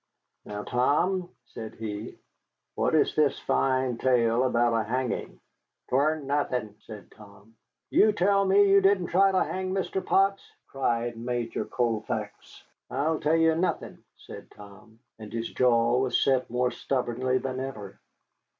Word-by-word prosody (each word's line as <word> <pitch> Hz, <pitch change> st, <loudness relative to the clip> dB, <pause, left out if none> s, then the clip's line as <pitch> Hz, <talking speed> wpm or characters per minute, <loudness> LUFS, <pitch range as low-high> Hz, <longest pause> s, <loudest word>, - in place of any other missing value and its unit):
Now, 105 Hz, 0 st, -6 dB
Tom," 175 Hz, -, 0 dB, 0.2 s
said 110 Hz, -1 st, -9 dB
he, 105 Hz, -1 st, -6 dB, 0.6 s
"what -, -, 0 dB
is -, -, +2 dB
this -, -, +2 dB
fine 130 Hz, -, 0 dB
tale 120 Hz, -1 st, +2 dB
about 120 Hz, -2 st, +2 dB
a 115 Hz, -1 st, +1 dB
hanging?" 125 Hz, +3 st, -3 dB, 0.5 s
"'Twan't 150 Hz, +4 st, +1 dB
nothin'," 130 Hz, -6 st, -2 dB
said 105 Hz, -3 st, -12 dB
Tom. 105 Hz, +1 st, -17 dB, 0.4 s
"You 215 Hz, -, +5 dB
tell 200 Hz, 0 st, +2 dB
me 200 Hz, +1 st, +4 dB
you 195 Hz, 0 st, +5 dB
didn't 195 Hz, -2 st, +2 dB
try 195 Hz, +2 st, +4 dB
to 185 Hz, -, +2 dB
hang 185 Hz, 0 st, -4 dB
Mr. 190 Hz, 0 st, -2 dB
Potts!" 195 Hz, 0 st, +2 dB, 0.2 s
cried 120 Hz, -3 st, -2 dB
Major 120 Hz, 0 st, -3 dB
Colfax. 115 Hz, -3 st, -4 dB, 0.3 s
"I 150 Hz, +5 st, 0 dB
tell 155 Hz, +2 st, +2 dB
you 165 Hz, 0 st, +4 dB
nothin'," 170 Hz, +3 st, -3 dB
said -, -, -12 dB
Tom, 105 Hz, +2 st, -15 dB, 0.2 s
and 110 Hz, -1 st, -10 dB
his 115 Hz, 0 st, -4 dB
jaw 120 Hz, -1 st, +3 dB
was 130 Hz, -1 st, +1 dB
set 130 Hz, -2 st, +1 dB
more 125 Hz, +1 st, 0 dB
stubbornly 130 Hz, -1 st, -1 dB
than 130 Hz, 0 st, -4 dB
ever. 120 Hz, -7 st, -7 dB
130 Hz, 140 wpm, -27 LUFS, 115-160 Hz, 0.6 s, You